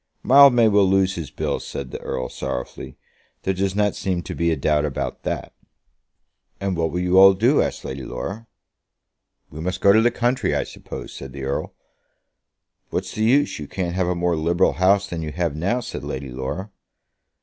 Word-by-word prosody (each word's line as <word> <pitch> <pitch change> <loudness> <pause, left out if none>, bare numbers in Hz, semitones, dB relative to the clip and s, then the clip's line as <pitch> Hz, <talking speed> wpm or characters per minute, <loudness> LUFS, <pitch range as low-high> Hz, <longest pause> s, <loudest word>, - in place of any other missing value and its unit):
"Mildmay 130 -4 +7
will 100 -2 +4
lose 95 -1 +3
his 85 -6 -6
bill," - - -2
said 65 -2 -7
the - - -6
Earl, 65 - -3
sorrowfully. 60 - -6 0.5
"There 95 - 0
does 95 +1 -1
not 105 -1 +2
seem 90 -2 -2
to - - -6
be 85 0 0
a 80 - +2
doubt 75 +1 +1
about 75 -3 -3
that." - - -4 1.1
"And 95 -1 -1
what 80 -1 0
will 90 +3 -2
you 90 +1 +4
all 95 0 +8
do?" 120 +9 +3
asked - - -3
Lady 65 +1 -5
Laura. 95 - -6 1.0
"We 75 - -9
must 90 +2 -3
go 100 - +5
to 110 - +5
the 120 - +4
country, 120 +2 0
I - - +1
suppose," - - -9
said 65 -1 -9
the 70 -1 -7
Earl. 70 +1 -3 1.1
"What's - - -3
the 110 - -1
use? 135 - +2
You 75 - -6
can't 90 0 -3
have 90 -1 0
a 90 - 0
more 85 0 0
liberal 85 +3 +2
House 100 +2 +3
than 85 -4 -5
you 80 -1 -4
have 85 -2 -1
now," 100 +11 0
said - - -7
Lady 65 -1 -5
Laura. 65 +11 -5
90 Hz, 195 wpm, -22 LUFS, 80-100 Hz, 1.1 s, all